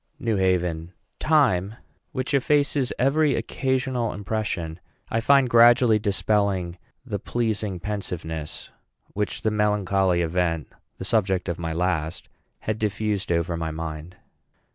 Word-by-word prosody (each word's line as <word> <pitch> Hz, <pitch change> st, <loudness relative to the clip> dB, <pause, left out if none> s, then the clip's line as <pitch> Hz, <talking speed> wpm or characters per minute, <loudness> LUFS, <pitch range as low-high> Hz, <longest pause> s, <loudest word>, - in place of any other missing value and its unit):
NEW 115 Hz, -3 st, -1 dB
HAVEN. 90 Hz, -2 st, 0 dB, 0.3 s
Time, 115 Hz, -, +2 dB, 0.4 s
which 130 Hz, +2 st, -3 dB
effaces 140 Hz, -1 st, +2 dB
every 140 Hz, +2 st, +3 dB
occasional 130 Hz, 0 st, -1 dB
impression, 95 Hz, -5 st, -3 dB, 0.3 s
I 115 Hz, -, +1 dB
find 140 Hz, +2 st, +5 dB
gradually 120 Hz, -1 st, +6 dB
dispelling 100 Hz, -4 st, 0 dB, 0.3 s
the 105 Hz, -5 st, -3 dB
pleasing 110 Hz, -4 st, -2 dB
pensiveness 85 Hz, -5 st, -5 dB, 0.4 s
which 105 Hz, +1 st, -2 dB
the 110 Hz, -, +2 dB
melancholy 100 Hz, -4 st, +2 dB
event, 85 Hz, -2 st, -1 dB, 0.3 s
the 95 Hz, -, -6 dB
subject 95 Hz, -4 st, +1 dB
of 85 Hz, -2 st, -3 dB
my 80 Hz, -1 st, -3 dB
last, 85 Hz, -1 st, -2 dB, 0.3 s
had 110 Hz, 0 st, -2 dB
diffused 105 Hz, -2 st, -1 dB
over 85 Hz, 0 st, 0 dB
my 80 Hz, -1 st, -3 dB
mind. 80 Hz, +2 st, -6 dB
100 Hz, 120 wpm, -24 LUFS, 85-115 Hz, 0.4 s, gradually